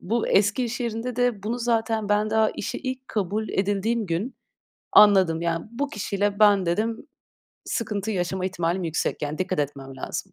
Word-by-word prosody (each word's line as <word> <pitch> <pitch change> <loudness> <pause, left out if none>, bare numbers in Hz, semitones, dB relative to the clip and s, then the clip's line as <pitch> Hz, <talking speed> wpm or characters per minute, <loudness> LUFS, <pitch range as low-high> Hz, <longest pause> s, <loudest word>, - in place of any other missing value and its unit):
bu 225 +5 -1
eski 205 +5 +3
iş 245 +2 -4
yerinde 235 +1 -3
de 245 -5 +1
bunu 230 +4 -2
zaten 225 -2 0
ben 210 +1 +2
daha 220 0 +3
işe - - -4
ilk 260 -1 -5
kabul 210 +1 -2
edildiğim 205 +3 0
gün 175 +10 -2 0.6
anladım. 190 -6 +6
Yani, 165 -1 -1
"Bu 280 +4 -2
kişiyle 205 -1 -2
ben" 205 -3 +5
dedim, 215 +7 -1 0.6
"sıkıntı 215 -2 -2
yaşama 185 -1 -2
ihtimalim 175 0 -1
yüksek, 160 -1 -2
yani, 150 +1 -3
dikkat 185 -1 -1
etmem 135 -2 -4
lazım." - - -5
205 Hz, 165 wpm, -25 LUFS, 185-225 Hz, 0.6 s, anladım